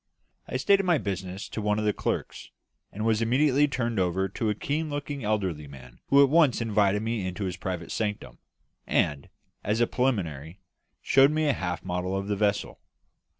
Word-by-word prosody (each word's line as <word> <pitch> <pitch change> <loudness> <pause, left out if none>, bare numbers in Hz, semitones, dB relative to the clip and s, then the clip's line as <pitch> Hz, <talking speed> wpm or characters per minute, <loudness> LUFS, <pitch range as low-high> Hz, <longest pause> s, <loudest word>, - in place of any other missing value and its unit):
I 130 - -2
stated 195 +9 +4
my 175 -3 +3
business 95 -3 -4
to 110 - -4
one 105 0 +1
of 110 - -1
the 105 - +2
clerks, - - -4 0.4
and 105 +2 -4
was 110 -1 +2
immediately 135 +5 +3
turned 120 -5 -2
over 95 +1 +1
to 110 +3 -2
a 105 - 0
keen 150 +7 -2
looking 145 -2 -4
elderly 95 -8 -1
man 65 -3 -13
who 140 +1 +6
at 140 - +3
once 155 -5 +4
invited 105 -2 +1
me 115 -2 -2
into 95 +2 -4
his 90 -2 -3
private 90 -2 -5
sanctum, 105 -2 -3 0.5
and, 70 -2 0 0.3
as 105 +3 0
a 120 - +4
preliminary, 95 - -2 0.4
showed 135 +1 +5
me 155 +1 0
a 145 - +3
half 90 -5 -4
model 90 +1 -2
of 100 +1 -4
the 105 - +1
vessel. 105 0 -1
105 Hz, 185 wpm, -27 LUFS, 95-130 Hz, 0.5 s, who